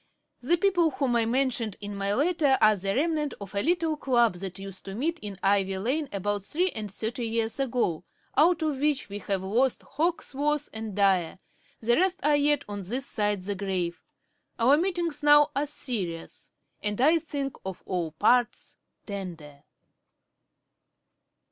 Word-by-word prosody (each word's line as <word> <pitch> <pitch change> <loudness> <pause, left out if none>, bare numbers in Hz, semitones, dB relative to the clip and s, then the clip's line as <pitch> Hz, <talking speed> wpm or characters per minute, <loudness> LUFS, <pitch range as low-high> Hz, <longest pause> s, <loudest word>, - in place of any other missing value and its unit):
The 335 +8 +2
people 350 -3 +3
whom 265 -4 -1
I 230 -1 +3
mentioned 240 -4 0
in 205 -1 -6
my 200 0 -1
letter 295 -2 +3
are 215 0 +5
the 195 0 -2
remnant 300 +1 0
of 200 -1 -9
a 200 - 0
little 330 - +1
club 240 -7 +2
that 190 0 -6
used 195 -1 -8
to 195 - -6
meet 325 +8 -1
in 205 -5 -7
Ivy 195 -1 +2
lane 270 +9 -1
about 205 0 -2
three 355 - +1
and 210 -3 -6
thirty 230 +3 -3
years 225 +2 -1
ago, 245 -11 0 0.3
out 325 +1 +4
of 300 -4 -1
which 290 -5 0
we 200 +1 -5
have 195 -1 -2
lost 235 +7 +1
Hawkesworth 295 -2 -1
and 220 -3 -6
Dyer; 190 -5 +2 0.4
the 235 +2 +3
rest 375 +1 +2
are 295 0 +4
yet 290 0 +2
on 205 -1 -5
this 245 +8 -2
side 205 -6 0
the 205 +2 -2
grave. 190 -3 -3 0.6
Our 245 +5 +5
meetings 340 -2 0
now 295 0 +6
are 285 +2 0
serious, 195 - -3 0.3
and 210 +1 -2
I 310 +6 +5
think 285 -3 -4
on 190 -1 -4
all 170 -4 -2
parts 240 +7 +1 0.3
tender.' 170 -8 -8
235 Hz, 160 wpm, -27 LUFS, 200-295 Hz, 0.6 s, now